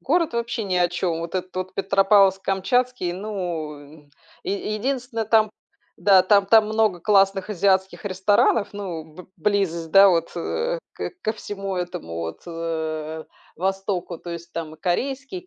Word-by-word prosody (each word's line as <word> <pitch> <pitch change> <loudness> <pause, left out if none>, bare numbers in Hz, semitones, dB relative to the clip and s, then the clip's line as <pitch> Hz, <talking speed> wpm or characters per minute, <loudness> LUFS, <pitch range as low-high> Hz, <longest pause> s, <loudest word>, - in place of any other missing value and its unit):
город 335 -7 +1
вообще 235 -1 -2
ни 185 -2 -1
о 175 -1 +3
чём. 175 -1 -2
Вот 170 +2 -6
этот 185 0 -3
вот 185 0 -4
Петропавловск-Камчатский, 195 +2 +2
ну, 180 -6 -4
м, 145 0 -16 0.3
е 200 +2 -2
единственное, 245 -1 -2
там 215 -1 +4 0.5
да, 195 -2 +6
там 200 +1 +4
там 220 +1 +6
много 215 -4 +1
классных 195 0 +3
азиатских 190 +2 +1
ресторанов, 200 +2 +2
ну, 185 -6 -5
б 160 +3 -13
близость, 180 -6 0
да 195 +2 +8
вот 170 -3 +1
э, - - -2 0.2
к - - -4
ко 220 - 0
всему 195 -3 -5
этому 175 - -5
вот, 85 0 -5
э, 160 -2 -4 0.3
востоку. 190 -1 -2
То 175 - -8
есть 170 0 -8
там 160 -2 -5
и 160 - -21
корейские, 270 - -2
и - - -27
190 Hz, 155 wpm, -23 LUFS, 170-210 Hz, 0.5 s, да